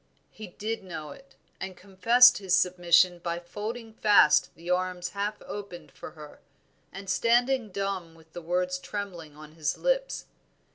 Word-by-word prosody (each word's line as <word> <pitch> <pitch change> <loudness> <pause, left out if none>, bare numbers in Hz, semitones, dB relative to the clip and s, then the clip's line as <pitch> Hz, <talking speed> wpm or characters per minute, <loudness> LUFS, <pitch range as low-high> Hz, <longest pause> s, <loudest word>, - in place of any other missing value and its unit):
He 215 - -10
did 215 +4 -5
know 160 -5 -7
it, 275 - -15 0.2
and 190 -1 -6
confessed 230 +6 +5
his 190 -2 +1
submission 180 -1 +3
by 170 0 -3
folding 220 +6 -7
fast 205 -8 +5
the 165 +3 -14
arms 180 0 -1
half 205 +2 -3
opened 200 -4 -8
for - - -11
her, 150 -1 -12 0.5
and 195 +1 -9
standing 240 +3 +2
dumb 190 -4 -4
with 160 0 -21
the 175 - -7
words 180 +2 -1
trembling 175 -8 -7
on 155 0 -12
his 155 -3 -2
lips. - - -1
185 Hz, 150 wpm, -27 LUFS, 175-210 Hz, 0.5 s, confessed